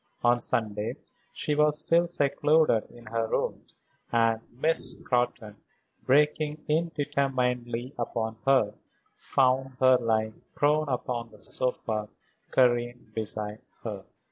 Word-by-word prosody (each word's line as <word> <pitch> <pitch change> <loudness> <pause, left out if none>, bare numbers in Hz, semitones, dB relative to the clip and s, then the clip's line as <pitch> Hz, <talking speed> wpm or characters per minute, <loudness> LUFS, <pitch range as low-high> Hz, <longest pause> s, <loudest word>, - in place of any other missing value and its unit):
On 120 0 +4
Sunday 110 0 -1 0.4
she 155 -10 -2
was 150 0 +3
still 170 +2 +3
secluded 150 -5 +2
in 120 0 -15
her 115 0 -1
rooms, - - -3 0.4
and 115 -1 +2
Miss 155 +7 +1
Scrotton, 120 -4 -1 0.5
breaking 150 +2 +2
in 160 +3 +1
determinedly 125 -3 -1
upon 110 -1 -2
her, 130 -7 +4 0.4
found 130 0 +1
her 130 -1 +6
lying 110 -2 -1
prone 150 +1 +2
upon 120 -2 -2
the 105 - -17
sofa, 110 -4 -2 0.4
Karen 120 -1 +2
beside 105 -1 -4 0.2
her. - - -5
125 Hz, 115 wpm, -28 LUFS, 115-145 Hz, 0.5 s, her